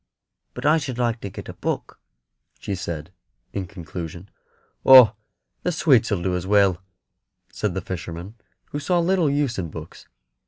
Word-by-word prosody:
But 125 - -6
I 155 +2 +5
should 130 -5 -5
like 120 -1 0
to 100 - -5
get - - -9
a - - -7
book," - - -4 0.6
she 100 - -4
said, 85 -3 -5 0.4
in 95 -2 -3
conclusion. 85 -1 -8 0.5
"Oh, 130 -5 +9 0.5
the 180 - 0
sweets 135 -8 +3
'll 90 -4 0
do 90 -1 0
as 90 +1 -3
well," 100 -3 +3 0.7
said 105 -5 -2
the 95 - -2
fisherman, 85 +2 -6 0.4
who 145 - -3
saw 175 +5 +1
little 175 -2 +2
use 140 -6 0
in 85 -3 -3
books. 80 +1 -10
100 Hz, 160 wpm, -23 LUFS, 90-130 Hz, 0.7 s, Oh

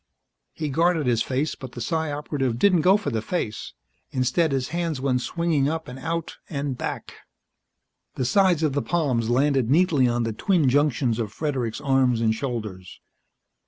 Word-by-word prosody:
He 155 -2 -3
guarded 165 +1 +2
his 120 -2 +2
face 140 +4 -1
but 130 -2 -10
the - - -7
Psi 160 +5 -1
Operative 140 -4 -2
didn't 180 +4 +4
go 190 +5 +5
for 150 -9 -4
the 110 -2 -1
face. 110 -4 -4 0.4
Instead 130 +5 +1
his 130 -2 -1
hands 170 -4 -2
went 130 -2 0
swinging 160 -3 0
up 160 0 -3
and 125 +1 -8
out 165 +3 -4
and 140 -3 -3
back. - - -5 1.0
The 130 - -1
sides 180 +3 +3
of 150 -3 +1
the 140 - 0
palms 130 -10 0
landed 135 -1 +2
neatly 150 -4 +4
on 120 0 0
the 115 -1 -2
twin 165 - +2
junctions 130 -4 +1
of 110 -3 -2
Fredericks' 130 -3 -3
arms 135 -4 +2
and 110 -1 +2
shoulders. 110 -7 -5
135 Hz, 170 wpm, -24 LUFS, 120-160 Hz, 1.0 s, go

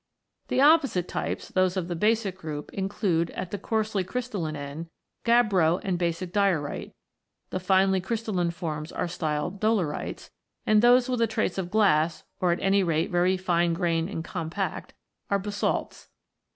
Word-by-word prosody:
The 260 - +1
opposite 280 - +4
types, - - -4
those 185 0 +1
of 175 -2 -2
the 175 - -3
basic 210 +1 +1
group, 150 -4 -7
include, 190 -4 0
at 180 - -5
the 205 - -3
coarsely 215 -1 -1
crystalline 200 -8 -3
end, 145 +3 -6 0.4
gabbro 200 -8 +3
and 185 -3 -1
basic 175 +1 -2
diorite; 190 -8 0 0.6
the 185 - -2
finely 190 0 +3
crystalline 200 -4 -1
forms 160 -2 -5
are - - -2
styled 170 +2 -3
dolerites, 210 -9 -1 0.3
and 215 -1 +4
those 245 +1 +5
with 250 -2 -1
a 230 - +4
trace 200 -3 -1
of 180 -2 -3
glass, 170 -6 +2 0.2
or 180 -1 +2
at 170 - 0
any 195 +1 +4
rate 165 -1 0
very 180 +1 +2
fine 175 -2 +1
grained 165 -1 0
and 165 -5 -4
compact, 175 +3 -4 0.3
are 200 - +3
basalts. 205 +1 -3
185 Hz, 155 wpm, -26 LUFS, 170-205 Hz, 0.6 s, those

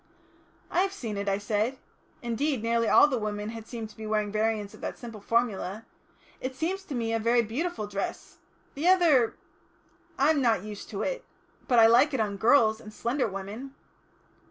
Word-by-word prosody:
"I - - +1
have 390 0 0
seen 230 - -5
it," 200 0 -2
I 195 - +1
said. 210 +5 -1 0.5
Indeed, 240 +1 -1
nearly 230 0 +1
all - - +7
the 260 -5 -1
women 210 0 -3
had 225 -1 -8
seemed 230 -3 -6
to - - -18
be 220 -1 -7
wearing 210 -1 0
variants 215 -1 -1
of - - -14
that - - -4
simple 230 -4 -9
formula. 220 -2 -1 0.5
"It 260 0 -4
seems 350 +8 -2
to 280 - -5
me 230 -1 -1
a 225 - +1
very 235 +2 +3
beautiful 255 +3 -3
dress. 200 -1 -5 0.3
The 300 +5 -1
other 330 -10 +4 0.8
I'm 285 +2 +3
not 225 -7 +2
used 210 -1 -8
to. - - -2 0.5
But 245 - +3
I 225 - +8
like 245 +6 +5
it - - -1
on 205 -2 -1
girls 220 -1 +4
and 215 - -10
slender 240 +5 -1
women." 210 +8 -7
230 Hz, 180 wpm, -28 LUFS, 215-265 Hz, 0.8 s, I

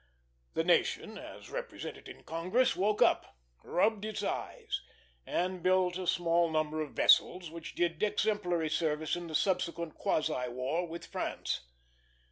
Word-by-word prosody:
The - - +2
nation, - - +2
as - - -10
represented - - -6
in - - -11
Congress, 185 +10 +1
woke 205 +3 +3
up, - - +1 0.3
rubbed, 210 +3 +2
its 215 0 -3
eyes, 425 -5 -3 0.5
and 180 0 -1
built 185 0 +3
a 185 - -4
small 170 0 +3
number 155 0 0
of 150 - -5
vessels 175 -3 +4
which 165 0 -8
did 170 -2 0
exemplary 180 -6 +1
service 155 -1 0
in 175 -1 -5
the 160 - -4
subsequent 170 -3 0
quasi 150 -5 0
war 130 +8 -1
with 170 +1 -7
France. 65 - -3
170 Hz, 140 wpm, -32 LUFS, 160-185 Hz, 0.5 s, vessels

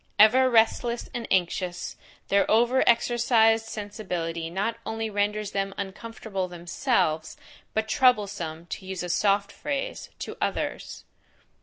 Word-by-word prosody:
Ever 255 +5 +6
restless 235 +1 +2
and 235 -1 -4
anxious, 180 0 -1 0.3
their 200 0 +3
over 240 +4 +4
exercised 230 -1 +3
sensibility 180 -7 -4
not 205 +6 -2
only 225 0 -3
renders 205 0 -1
them 195 0 -2
uncomfortable 200 -1 -5
themselves, 175 - -1 0.4
but 220 0 0
troublesome, 200 -10 +1
to 185 - -7
use 190 -2 -4
a 180 - -4
soft 200 +3 +2
phrase, 285 -1 -4
to - - -6
others. - - -3
205 Hz, 120 wpm, -26 LUFS, 185-230 Hz, 0.4 s, Ever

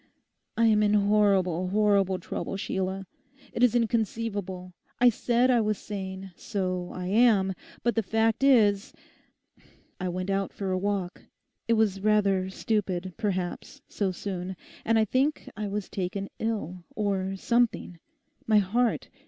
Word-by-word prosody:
I 230 - +4
am 215 -1 +4
in 210 0 +3
horrible, 200 -4 +3
horrible 200 -1 +2
trouble, 185 +2 -5
Sheila. 190 0 -3 0.5
It - - -3
is 245 -2 +4
inconceivable. 210 -5 -1 0.3
I 245 0 +7
said 240 +2 +2
I 240 -2 +4
was 215 -1 0
sane: 190 -2 -6
so 185 -2 -3
I 180 - -5
am, 200 -1 +4 0.3
but 240 - +2
the 225 - +1
fact 225 +4 +1
is—I 205 -5 -1
went 185 +2 -3
out 195 0 -1
for 195 -2 -3
a 185 - +1
walk; 195 -2 -3 0.4
it 230 - +3
was 210 -4 +1
rather 200 -3 +2
stupid, 190 -3 -2
perhaps, 185 -5 -3
so 200 -3 -1
soon: 185 0 -5 0.3
and 225 0 +3
I 220 - +4
think 270 +7 0
I 210 -1 -3
was 205 0 -3
taken 195 +1 -4
ill, 195 -6 -3
or 195 -2 -1
something—my 235 - -1
heart. 225 +4 +1
200 Hz, 135 wpm, -27 LUFS, 190-225 Hz, 0.5 s, I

